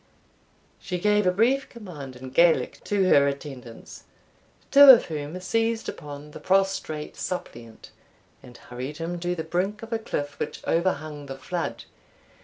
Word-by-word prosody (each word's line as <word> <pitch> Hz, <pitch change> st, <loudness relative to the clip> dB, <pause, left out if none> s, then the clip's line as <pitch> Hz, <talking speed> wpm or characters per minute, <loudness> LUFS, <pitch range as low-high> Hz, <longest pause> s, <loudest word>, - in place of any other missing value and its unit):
She 180 Hz, -, -4 dB
gave 210 Hz, +1 st, +2 dB
a -, -, +5 dB
brief 240 Hz, +8 st, +1 dB
command 160 Hz, -, -9 dB
in 130 Hz, +1 st, -9 dB
Gaelic 170 Hz, +3 st, +2 dB
to 205 Hz, -2 st, +1 dB
her 140 Hz, -3 st, +5 dB
attendants, 135 Hz, -4 st, -8 dB, 0.7 s
two 285 Hz, +1 st, +9 dB
of 250 Hz, -3 st, +9 dB
whom 155 Hz, +2 st, -5 dB
seized 225 Hz, +4 st, -1 dB
upon 145 Hz, 0 st, -8 dB
the -, -, -10 dB
prostrate 190 Hz, -5 st, 0 dB
suppliant, 115 Hz, -10 st, -7 dB, 0.5 s
and 125 Hz, -1 st, -14 dB
hurried 130 Hz, +4 st, -7 dB
him 170 Hz, +1 st, -4 dB
to 175 Hz, +1 st, -2 dB
the 160 Hz, -, -4 dB
brink 185 Hz, +6 st, -2 dB
of 225 Hz, +1 st, -6 dB
a 225 Hz, -, 0 dB
cliff 145 Hz, -9 st, -4 dB
which -, -, -5 dB
overhung 155 Hz, -4 st, -1 dB
the 135 Hz, 0 st, -7 dB
flood. 165 Hz, +6 st, -4 dB
170 Hz, 150 wpm, -25 LUFS, 145-195 Hz, 0.7 s, two